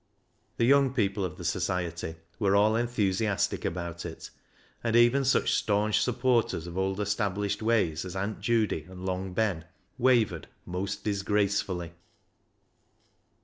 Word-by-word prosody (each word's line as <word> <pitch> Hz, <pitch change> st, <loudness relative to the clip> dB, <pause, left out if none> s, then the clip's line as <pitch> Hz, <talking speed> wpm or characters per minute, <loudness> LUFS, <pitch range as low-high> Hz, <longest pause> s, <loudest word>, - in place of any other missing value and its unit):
The 115 Hz, -, +3 dB
young 135 Hz, 0 st, +4 dB
people 100 Hz, -4 st, 0 dB
of 90 Hz, -4 st, -4 dB
the 90 Hz, -, -8 dB
Society 90 Hz, -2 st, -2 dB, 0.2 s
were 100 Hz, -3 st, +3 dB
all 105 Hz, +2 st, +4 dB
enthusiastic 110 Hz, -4 st, 0 dB
about 85 Hz, -1 st, -4 dB
it, 80 Hz, -, -8 dB, 0.5 s
and 115 Hz, -1 st, 0 dB
even 120 Hz, +4 st, +5 dB
such 135 Hz, -, +2 dB
staunch 105 Hz, 0 st, +2 dB
supporters 120 Hz, -8 st, +1 dB
of 85 Hz, 0 st, -8 dB
old 95 Hz, +1 st, -1 dB
established 105 Hz, -1 st, -1 dB
ways 105 Hz, -9 st, +1 dB
as 90 Hz, 0 st, -7 dB
Aunt 100 Hz, +3 st, -3 dB
Judy 110 Hz, -9 st, 0 dB
and 95 Hz, 0 st, -9 dB
Long 95 Hz, 0 st, -3 dB
Ben 95 Hz, -6 st, 0 dB, 0.3 s
wavered 115 Hz, -, +2 dB, 0.2 s
most 90 Hz, +2 st, -4 dB
disgracefully. 100 Hz, -4 st, 0 dB
100 Hz, 130 wpm, -28 LUFS, 90-115 Hz, 0.5 s, even